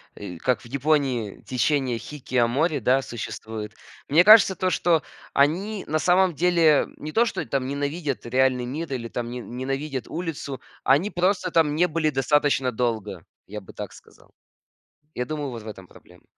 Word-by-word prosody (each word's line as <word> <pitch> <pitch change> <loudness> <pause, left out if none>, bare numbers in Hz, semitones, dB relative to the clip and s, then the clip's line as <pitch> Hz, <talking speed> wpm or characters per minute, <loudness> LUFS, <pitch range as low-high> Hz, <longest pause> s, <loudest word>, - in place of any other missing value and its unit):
э, 95 -4 -8
как 125 +8 0
в - - -16
Японии 135 -5 0
течение 130 0 0
хикикомори, 135 +3 0
да, 130 +3 +3
существует. 110 -3 -6 0.3
Мне 160 +5 +5
кажется 210 -1 +8
то, 185 - 0
что 165 -1 +2 0.3
они 185 +9 +1
на 155 +1 0
самом 180 +1 +3
деле 165 -2 +3
не 150 - -7
то, 230 +8 +3
что - - -3
там 130 -2 -2
ненавидят 140 +1 -3
реальный 130 0 +2
мир 145 +4 -4
или 115 -3 -4
там 120 0 -4
не 125 +1 -5
ненавидят 135 +3 -4
улицу, 150 -6 -5 0.2
они 145 +10 +3
просто 185 0 0
там 155 -3 +3
не 175 +3 +3
были 155 -1 +1
достаточно 135 -1 +1
долго, 110 -7 -3 0.2
я 105 +2 -6
бы 95 - -15
так - - -7
сказал. - - -19 0.8
Я 125 - -3
думаю, 150 -1 -4
вот 115 - -7
в 110 - -11
этом 95 -3 -9
проблема. - - -19
140 Hz, 165 wpm, -24 LUFS, 125-160 Hz, 0.8 s, кажется